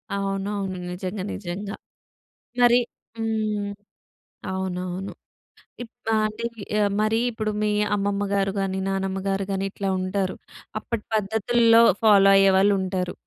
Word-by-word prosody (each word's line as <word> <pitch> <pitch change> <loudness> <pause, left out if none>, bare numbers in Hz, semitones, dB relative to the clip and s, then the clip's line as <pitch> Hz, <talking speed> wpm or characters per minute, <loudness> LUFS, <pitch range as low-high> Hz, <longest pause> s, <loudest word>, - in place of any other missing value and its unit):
అవునవును. 195 -1 -2
నిజంగా. 185 +2 -4
నిజంగా. 200 +2 -5 0.9
మరి 240 0 +7 0.4
హ్మ్. 215 -2 -1 0.8
అవునవును. 185 0 -4 0.7
ఇప్ 230 -1 -12
ఆహ్! 215 0 +2
అంటే 215 +2 -7 0.3
ఈ - - +2 0.2
మరి 215 +1 +2
ఇప్పుడు 220 -2 -2
మీ 210 - +2 0.2
అమ్మమ్మ 200 0 0
గారు 195 -1 +1
గాని, 190 -1 -1
నానమ్మ 195 0 -1
గారు 195 0 0
గాని 195 0 -1
ఇట్లా 195 0 -4
ఉంటారు. 185 0 -1 0.4
అప్పటి 220 0 -5
పద్ధతుల్లో 225 +2 +4 0.2
ఫాలో 200 -3 +6
అయ్యేవాళ్ళుంటారు. 190 -2 +3
200 Hz, 115 wpm, -24 LUFS, 190-215 Hz, 0.9 s, మరి